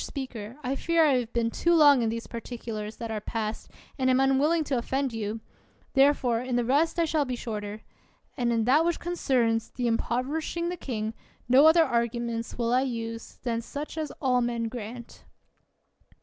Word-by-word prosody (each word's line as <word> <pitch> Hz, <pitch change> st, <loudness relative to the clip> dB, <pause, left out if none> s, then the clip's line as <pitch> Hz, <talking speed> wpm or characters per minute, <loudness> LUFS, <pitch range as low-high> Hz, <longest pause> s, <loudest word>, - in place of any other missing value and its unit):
Speaker, 250 Hz, -4 st, -6 dB
I 260 Hz, +2 st, -1 dB
fear 335 Hz, +3 st, +3 dB
I 270 Hz, -4 st, +4 dB
have 235 Hz, -2 st, -5 dB
been 230 Hz, -1 st, 0 dB
too 340 Hz, +6 st, +2 dB
long 290 Hz, -5 st, +7 dB
in 225 Hz, -, +1 dB
these 230 Hz, +1 st, -4 dB
particulars 225 Hz, -2 st, -6 dB
that 230 Hz, -2 st, -6 dB
are 215 Hz, -1 st, -3 dB
past, 220 Hz, 0 st, -4 dB, 0.3 s
and 260 Hz, 0 st, +2 dB
am 255 Hz, 0 st, +4 dB
unwilling 280 Hz, +5 st, +3 dB
to 275 Hz, -3 st, -1 dB
offend 265 Hz, +1 st, -1 dB
you; 220 Hz, 0 st, -4 dB, 0.5 s
therefore 270 Hz, -4 st, +3 dB
in 250 Hz, 0 st, -3 dB
the 245 Hz, -1 st, +1 dB
rest 295 Hz, +7 st, +2 dB
I 335 Hz, -, +3 dB
shall 310 Hz, -1 st, +1 dB
be 255 Hz, -2 st, -3 dB
shorter. 210 Hz, -2 st, -5 dB, 0.5 s
And 240 Hz, -3 st, 0 dB
in 230 Hz, -1 st, +1 dB
that 270 Hz, +7 st, +4 dB
which 340 Hz, 0 st, 0 dB
concerns 250 Hz, -10 st, 0 dB
the 250 Hz, -, -4 dB
impov 235 Hz, +2 st, 0 dB
erishing 320 Hz, +4 st, -2 dB
the -, -, -3 dB
king, 220 Hz, -9 st, -4 dB, 0.3 s
no 265 Hz, +5 st, +7 dB
other 325 Hz, +1 st, +7 dB
arguments 235 Hz, -3 st, -2 dB
will 235 Hz, 0 st, 0 dB
I 255 Hz, -, +4 dB
use 230 Hz, -3 st, -5 dB
than 230 Hz, -2 st, -1 dB
such 290 Hz, +6 st, -6 dB
as 310 Hz, -2 st, -3 dB
all 250 Hz, -3 st, +2 dB
men 235 Hz, -1 st, -1 dB
grant. 235 Hz, 0 st, -8 dB
245 Hz, 185 wpm, -27 LUFS, 230-280 Hz, 0.5 s, long